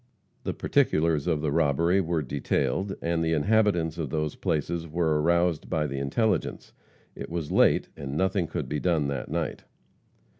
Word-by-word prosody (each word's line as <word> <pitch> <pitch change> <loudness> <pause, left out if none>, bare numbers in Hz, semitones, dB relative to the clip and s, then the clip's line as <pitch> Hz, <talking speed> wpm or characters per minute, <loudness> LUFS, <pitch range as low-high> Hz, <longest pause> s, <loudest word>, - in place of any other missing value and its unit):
The - - -2
particulars 80 -1 +1
of 80 -4 +1
the 75 -2 0
robbery 85 +5 +2
were 85 -3 -1
detailed, 80 +8 -1
and 85 0 0
the 80 0 +1
inhabitants 85 -2 +2
of 75 -4 -2
those 75 +1 -1
places 80 +2 -2
were 80 -1 +1
aroused 85 0 +1
by 75 -1 0
the 70 -2 -3
intelligence. 105 - -1 0.4
It - - -7
was 85 -3 -4
late - - +3
and 70 0 -5
nothing 95 -1 +1
could - - -4
be 75 - -2
done 80 -5 +1
that 70 - -4
night. 80 +1 -3
80 Hz, 160 wpm, -27 LUFS, 75-85 Hz, 0.4 s, late